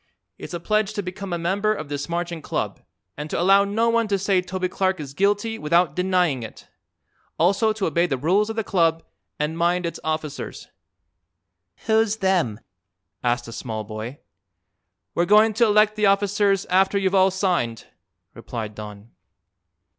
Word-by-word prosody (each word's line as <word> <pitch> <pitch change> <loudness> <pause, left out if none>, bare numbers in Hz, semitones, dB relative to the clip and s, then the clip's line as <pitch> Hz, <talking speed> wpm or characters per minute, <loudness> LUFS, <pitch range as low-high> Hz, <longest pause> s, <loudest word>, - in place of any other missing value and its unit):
It's - - -7
a - - -4
pledge 215 +3 0
to 205 - -3
become 185 +1 -6
a 175 - 0
member 195 +5 0
of 155 - -6
this 145 +2 -4
Marching 170 -1 -3
Club - - -3 0.3
and 150 +1 -6
to - - -2
allow 195 +3 +5
no 215 +3 0
one 230 -1 +2
to 200 -1 +1
say 195 -1 +1
Toby 185 0 -3
Clark 185 0 -1
is 140 -3 -7
guilty 205 +6 0
without 170 0 +2
denying 180 -7 +1
it. 110 - -10 0.7
Also 200 +6 +3
to 215 -2 -2
obey 170 +2 +1
the 135 -5 -1
rules 190 - +2
of 225 - -4
the 225 - -1
Club 165 -4 +1 0.3
and 155 +2 -2
mind 175 +1 +1
its 170 - -4
officers." 155 -2 -4 1.2
"Who's 220 0 +2
them?" 180 - 0 0.6
asked 120 -1 0
a - - -8
small 110 -2 -5
boy. 110 +5 -7 1.0
"We're 175 - +1
going 215 +3 +5
to 230 +2 +3
elect 210 0 +4
the 210 -1 +2
officers 200 0 +2
after 190 +2 +3
you've 190 -1 0
all 190 0 +5
signed," 180 - -1 0.5
replied 110 -3 -6
Don. 105 +1 -10
180 Hz, 165 wpm, -23 LUFS, 155-200 Hz, 1.2 s, allow